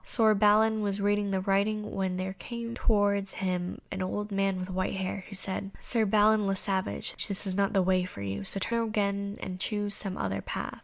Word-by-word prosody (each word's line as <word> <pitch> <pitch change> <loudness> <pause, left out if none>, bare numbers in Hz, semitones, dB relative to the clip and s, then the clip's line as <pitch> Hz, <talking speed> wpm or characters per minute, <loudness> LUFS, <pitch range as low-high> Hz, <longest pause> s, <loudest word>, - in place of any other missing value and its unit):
Sir 220 -2 +4
Balin 215 +1 +4
was 200 -2 0
still 200 0 -2
reading 205 0 +2
the 190 -1 0
writing 205 +2 0
when 190 -1 -1
there 190 +1 -3
came 235 +3 -6
towards 200 -3 +1
him 180 -1 -2
an 195 - -3
old 205 +3 -3
man 195 -1 +1
with 185 0 -5
white 185 +1 -1
hair, 190 0 -3
who 200 - -7
said, 195 +1 -3
"Sir 230 -3 +1
Balin 210 0 +4
le 195 - +1
Savage, 190 -1 -2
this 200 -1 -3
is 190 -1 -2
not 200 0 +1
the 195 -2 +3
way 185 0 +2
for 140 - -7
you, 100 0 -3
so 195 - +2
turn 230 +3 0
again 200 -1 -1
and 185 -1 -5
choose 205 0 -1
some 195 -2 +3
other 95 0 -2
path." - - -5
195 Hz, 215 wpm, -29 LUFS, 185-210 Hz, -, Sir